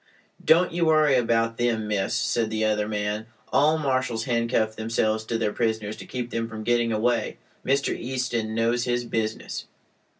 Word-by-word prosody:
"Don't 175 +3 +4
you 170 0 +1
worry 155 -2 +4
about 115 -1 +1
them, 115 -3 0
miss," 105 +1 0
said 115 0 0
the 110 0 0
other 105 -1 +1
man. 105 +1 -2 0.3
"All 155 +3 +4
marshals 130 -6 0
handcuff 115 -2 0
themselves 110 0 0
to 115 +1 -1
their 105 -2 -1
prisoners 110 -2 -1
to - - -10
keep 125 -1 -4
them 115 0 -2
from 110 -1 -6
getting 120 0 +2
away. 115 +2 0 0.3
Mr. 140 +1 +1
Easton 120 -3 -2
knows 115 +1 +1
his 120 0 0
business." 110 -1 -3
115 Hz, 165 wpm, -25 LUFS, 110-125 Hz, 0.3 s, Don't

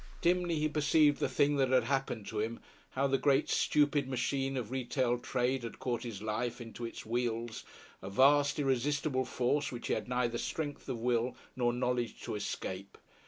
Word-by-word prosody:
Dimly 175 -1 +2
he 155 0 +1
perceived 150 0 +3
the - - +1
thing 145 0 +2
that 135 -2 +3
had 130 0 +4
happened 135 -6 -1
to 110 - -3
him 115 +2 -2 0.3
how 135 +1 0
the 135 -1 +2
great, 140 0 +3
stupid 145 -2 +2
machine 135 +1 -1
of 120 -2 -4
retail 125 -1 0
trade 125 +1 0
had 115 - -7
caught 120 -2 -2
his 110 -5 -6
life 115 +3 -2
into 120 0 -7
its 115 - -7
wheels, 115 0 -2 0.4
a 95 - -6
vast, 145 +6 +4
irresistible 135 0 +1
force 135 +4 0
which 120 - -6
he - - +3
had - - -2
neither 120 -2 0
strength 145 -3 -4
of 120 - -2
will 120 +1 0 0.2
nor 120 -1 +2
knowledge 125 -1 -1
to - - -4
escape. 100 -2 -5
130 Hz, 180 wpm, -32 LUFS, 120-140 Hz, 0.4 s, had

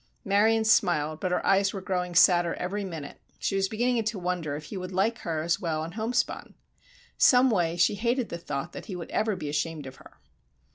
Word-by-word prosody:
Marion 220 +3 +3
smiled, 155 -7 +2
but 185 - -1
her 180 - -1
eyes 195 0 +3
were 195 - -4
growing 180 -2 -3
sadder 175 -1 +5
every 200 +3 -3
minute. 160 -7 -7 0.2
She - - -2
was 195 0 +1
beginning 240 +1 0
to 215 0 -2
wonder 175 -5 -2
if 150 - -7
he 155 - -9
would 185 0 -6
like 200 +5 0
her 160 -2 -3
as 170 +3 0
well 160 -5 -2
in 165 - -6
homespun. 225 +5 -2 0.6
Some 250 0 +6
way 175 -4 0
she 175 - +3
hated 235 +3 -1
the 170 - -5
thought 155 0 -5
that - - -9
he 195 - -5
would 170 -2 -7
ever 215 -2 0
be 150 - -6
ashamed 150 0 -2
of 130 0 -10
her. - - -17
180 Hz, 210 wpm, -27 LUFS, 165-210 Hz, 0.6 s, Some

